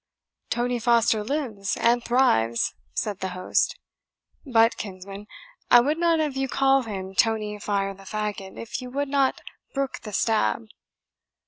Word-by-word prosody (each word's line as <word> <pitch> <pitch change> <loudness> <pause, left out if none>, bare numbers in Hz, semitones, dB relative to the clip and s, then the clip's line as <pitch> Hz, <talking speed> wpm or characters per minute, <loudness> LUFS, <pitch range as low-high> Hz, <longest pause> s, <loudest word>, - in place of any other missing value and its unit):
"Tony 245 0 0
Foster 230 -2 +3
lives 220 -6 -2
and 235 +1 +3
thrives," 115 - +2 0.2
said 200 - -3
the 190 - -2
host. 185 - +1 0.7
"But, 230 -4 +4
kinsman, 195 +1 -8 0.4
I 240 - +9
would 295 +6 +1
not 335 -1 +3
have 300 -3 -1
you 270 0 0
call 270 +1 +3
him 195 -5 -6
Tony 210 0 +1
Fire 200 -1 -1
the 195 0 -15
Fagot, 210 -2 -4
if 230 +3 -5
you 250 - -7
would 280 +2 -2
not 275 -1 +1 0.3
brook 275 -1 -2
the 215 - -8
stab." 115 - +1
225 Hz, 145 wpm, -25 LUFS, 195-265 Hz, 0.7 s, I